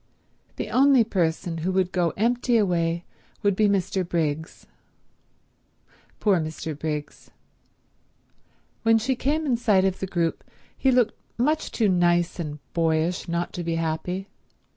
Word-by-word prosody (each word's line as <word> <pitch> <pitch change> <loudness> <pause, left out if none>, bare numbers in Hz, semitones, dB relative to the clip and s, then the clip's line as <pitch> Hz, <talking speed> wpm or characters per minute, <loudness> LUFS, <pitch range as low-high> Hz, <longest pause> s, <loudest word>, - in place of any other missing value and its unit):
The 210 - -5
only 265 +1 +5
person 170 -4 -1
who 175 +4 -1
would 185 -1 +1
go 175 -2 +1
empty 240 +2 +2
away 170 -4 0 0.4
would 200 -2 +3
be 215 +1 +3
Mr. 190 -1 0
Briggs. 160 -2 -3 1.5
Poor 200 -5 +3
Mr. 155 0 -4
Briggs. 150 0 -5 1.5
When 225 0 +4
she 250 +4 0
came 300 +6 0
in 255 -5 +1
sight 205 -5 +3
of 190 -1 0
the 190 - -3
group 170 -2 -1 0.3
he 270 - +1
looked 245 -3 +3 0.2
much 300 +6 0
too 220 - +1
nice 175 -1 +2
and 150 -3 -4 0.2
boyish 165 +2 0
not 170 +1 -2
to 175 - -4
be 165 0 -1
happy. 165 +4 -2
180 Hz, 140 wpm, -25 LUFS, 165-225 Hz, 1.5 s, only